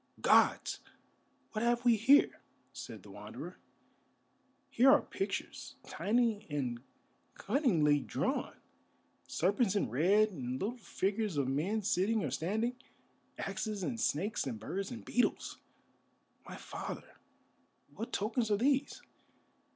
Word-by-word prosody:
"Gods! - - +3 0.7
What 215 0 -2
have 240 +1 +1
we 240 -2 +6
here?" 260 +7 +4 0.3
said - - -8
the - - -13
Wanderer. - - -9 1.1
"Here 255 +3 +5
are 290 +2 +6
pictures, 195 0 -4
tiny 225 -1 0
and 125 -5 -2 0.5
cunningly 185 - +2
drawn, - - -2 0.7
serpents 200 +3 +1
in 200 - 0
red, 200 - +3
and 130 -8 -4
little 220 +5 -2
figures 210 -5 -2
of 140 -2 +1
men 180 +11 -1
sitting 205 +3 +1
or - - -2
standing, 220 +8 -1 0.6
axes 210 -3 -3
and 235 +4 -3
snakes 205 - 0
and 115 -4 -4
birds 190 - -4
and 240 -2 -8
beetles! 245 - 0 0.9
My - - -7
father, - - -7 0.8
what 225 - -6
tokens 220 +2 -1
are 205 - +3
these?" 275 +4 +1
210 Hz, 120 wpm, -33 LUFS, 175-235 Hz, 1.1 s, we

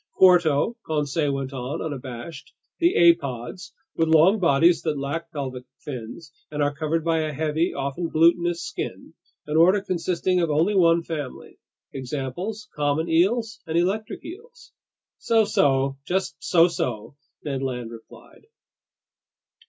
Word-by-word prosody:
"Quarto," 180 - +4
Conseil 150 -1 -1
went 135 0 -4
on, 130 +4 -4
unabashed, 135 0 -7 0.3
"the 345 +1 +3
apods, 170 - +2 0.2
with 165 - +1
long 165 +7 +5
bodies 170 0 +4
that 155 -3 -2
lack 140 +5 -4
pelvic 130 -5 -5
fins 135 +4 -8 0.2
and 150 -1 -1
are 145 0 0
covered 155 +2 -2
by 165 -1 +2
a 155 -1 -1
heavy, 155 +3 0
often 140 +5 -3
glutinous 170 +1 +2
skin, 415 - -6 0.3
an 150 +1 -1
order 185 +5 +5
consisting 185 -1 -1
of 170 -2 +1
only 160 +7 +2
one 170 -3 +4
family. 150 -5 -7 0.3
Examples: 145 - -5
common 150 +2 0
eels 215 +7 +1
and 160 +1 -1
electric 195 +5 -1
eels." 470 +8 -12 0.5
"So 225 -1 +3
so, 135 -5 +1
just 185 +5 -2
so 170 -1 +4
so!" 125 -9 -4 0.3
Ned 135 -3 -3
Land 125 -3 -4
replied. 115 - -15
160 Hz, 135 wpm, -24 LUFS, 140-180 Hz, 0.5 s, long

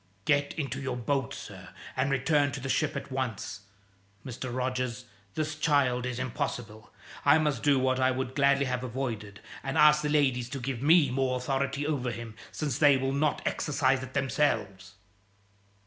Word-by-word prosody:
"Get 145 0 +2
into 140 -2 -3
your 130 -2 -3
boat, 135 +1 -1
sir, - - -9 0.3
and 130 +1 +1
return 140 +1 +2
to 140 - -4
the 135 - -5
ship 155 +2 +1
at - - -6
once! 125 -6 -3 0.7
Mr. 130 0 -5
Rogers, 125 0 -2 0.3
this 155 0 -1
child 140 -5 +1
is 125 -1 -4
impossible. 115 -3 -4 0.3
I 145 +2 +6
must 150 -6 0
do 145 -2 +4
what 130 0 +1
I 130 0 +4
would 130 0 -2
gladly 140 0 +3
have 125 -1 -2
avoided, 110 -5 -4 0.2
and 135 +2 -3
ask 150 0 +6
the 150 - -1
ladies 130 -5 +2
to 135 - -5
give 125 -1 -4
me 150 -2 +5
more 130 0 0
authority 135 +2 -1
over 140 -5 -1
him, 115 -1 -6 0.2
since 145 -6 -3
they 145 -3 +6
will 135 0 -1
not 145 +1 0
exercise 135 -2 +1
it 130 +1 -9
themselves." 105 -9 -1
130 Hz, 170 wpm, -29 LUFS, 125-145 Hz, 0.7 s, I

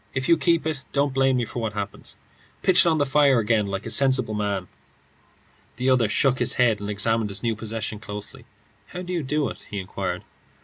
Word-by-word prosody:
If 130 0 -1
you 170 - +6
keep 165 0 +1
it, 155 -4 -2
don't 140 -1 +1
blame 135 -1 +2
me 120 - 0
for 120 - -6
what 110 -2 -3
happens. 100 -1 -6 0.5
Pitch 185 -1 +5
it - - +6
on 160 - +2
the 145 - +2
fire 140 -1 +4
again 110 -2 +1
like 100 +1 -4
a 115 - -4
sensible 130 -4 +3
man." 100 -3 -2 1.1
The 130 +2 +1
other 120 -4 +3
shook 130 +4 +2
his - - +1
head 115 -4 +2
and 100 0 -5
examined 110 +1 +1
his 100 +3 -4
new 115 -1 0
possession 110 -1 -4
closely. 105 -2 -8 0.4
"How 180 - -7
do 180 0 -5
you 170 - 0
do 145 +1 -1
it?" - - -11
he 105 - -5
inquired. 95 -1 -4
120 Hz, 215 wpm, -24 LUFS, 105-140 Hz, 1.1 s, you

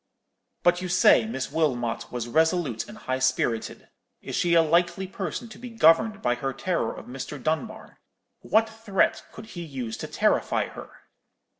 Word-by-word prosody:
"'But 175 0 +3
you 185 - -4
say 175 -7 +6
that 110 - -5
Miss 130 +2 -4
Wilmot 125 -8 -1
was 120 -1 -4
resolute 160 -3 +1
and 210 - -10
high 130 -11 -3
spirited. 130 -3 -1 0.3
Is - - -6
she 170 -1 +2
a 165 - +6
likely 170 +3 +1
person 190 +4 -5
to 215 - -12
be 250 0 -8
governed 215 +1 +3
by 120 - +2
her 135 +2 -3
terror 170 -5 -1
of - - -10
Mr. 135 +3 -7
Dunbar? 160 - -4 0.4
What 225 +1 +2
threat 220 -1 0
could 220 - -10
he 175 - -6
use 130 -8 -5
to - - -6
terrify - - +1
her?' - - -10
165 Hz, 170 wpm, -26 LUFS, 130-195 Hz, 0.4 s, say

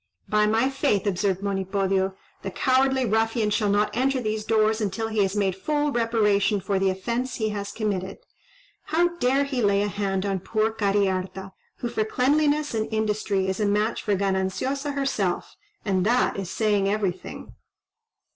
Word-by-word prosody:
"By 210 0 +3
my 225 +4 +2
faith," 270 -7 0
observed 195 0 0
Monipodio, 195 -1 0 0.3
"the 195 - -4
cowardly 265 +4 +2
ruffian 225 0 +1
shall 210 0 +1
not 205 +1 +1
enter 265 +2 +1
these 215 -2 -2
doors 220 0 +2
until 215 +2 -2
he 220 -1 +1
has 195 0 0
made 195 -3 +1
full 295 +8 0
reparation 210 -4 +2
for 195 +1 -1
the 190 0 +2
offence 235 +7 -2
he 220 -3 -1
has 200 -1 -4
committed. 200 -3 -3 0.7
How 335 +3 +2
dare 265 +3 +3
he 275 -3 -2
lay 200 -1 +3
a - - 0
hand 195 -1 -2
on 195 -1 -1
poor 215 +4 0
Cariharta, 195 -2 -1 0.3
who 240 - -1
for 220 - 0
cleanliness 290 +5 +1
and 220 0 -2
industry 210 -3 0
is 190 +1 -2
a 210 - +1
match 210 +3 0
for 205 - 0
Gananciosa 200 +9 -1
herself, 215 -10 -1 0.3
and 190 -3 +1
that 240 +5 +2
is 195 -3 -4
saying 205 -2 +1
everything." 200 -3 -3
210 Hz, 165 wpm, -25 LUFS, 195-235 Hz, 0.7 s, By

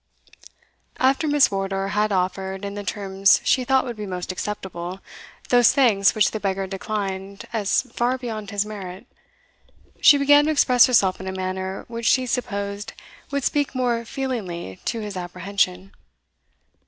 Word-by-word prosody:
After 270 +4 +2
Miss 290 -1 +4
Wardour 195 0 -2
had 210 +1 0
offered, 190 +1 -2
in 200 - -5
the 205 0 -6
terms 195 0 +2
she 255 - +2
thought 265 +1 +2
would 240 -2 -5
be 210 -1 -5
most 180 -1 -4
acceptable, 185 -2 -5 0.5
those 245 -1 +5
thanks 215 -8 +4
which 215 -2 +3
the 220 - -4
beggar 195 -1 -1
declined 195 0 -5
as 210 0 +1
far 250 0 -1
beyond 220 -5 -6
his 205 0 -1
merit, 195 -1 -8 1.0
she 290 - +8
began 290 +1 +5
to 310 - +1
express 255 -5 +5
herself 200 -7 +3
in 190 - -7
a - - -2
manner 190 0 -4
which 230 0 -4
she 255 -1 +3
supposed 200 -4 -3 0.4
would 280 -1 -2
speak 285 0 0
more 240 -2 0
feelingly 210 - -5
to 230 - -2
his 210 -2 -6
apprehension. 185 +1 -2
205 Hz, 155 wpm, -23 LUFS, 190-245 Hz, 1.0 s, she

